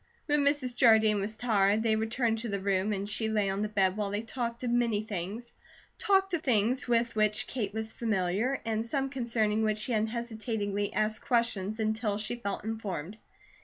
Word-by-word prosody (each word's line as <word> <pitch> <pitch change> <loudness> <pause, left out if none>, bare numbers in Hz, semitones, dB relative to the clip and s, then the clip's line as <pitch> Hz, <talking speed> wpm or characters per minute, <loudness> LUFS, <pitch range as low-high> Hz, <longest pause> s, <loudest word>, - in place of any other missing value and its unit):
When 295 -1 +2
Mrs. 280 -4 +2
Jardine 220 -4 +5
was 215 +2 -4
tired, 215 -3 +2
they 220 -1 +2
returned 225 +1 0
to 235 0 -4
the 200 -1 -2
room 195 +1 0
and 200 -1 -2
she 220 +1 0
lay 210 -3 +1
on 195 +1 -2
the 215 - 0
bed 195 -3 +2
while 210 -1 -2
they 205 +2 -2
talked 235 0 -4
of 245 - -1
many 235 -3 +1
things; 210 +3 -5 0.5
talked 390 -3 +2
of 340 - 0
things 245 -1 +1
with 235 -1 +1
which 215 -1 +2
Kate 215 -6 -3
was 220 +1 -4
familiar, 215 +3 0
and 220 -1 -1
some 270 +3 -1
concerning 225 -5 0
which 215 -1 +1
she 225 +3 -2
unhesitatingly 220 -2 -2
asked 215 0 0
questions 230 -4 0
until 220 -1 0
she 215 +3 -3
felt 200 -5 -4
informed. 210 -4 -5
220 Hz, 185 wpm, -30 LUFS, 205-235 Hz, 0.5 s, Jardine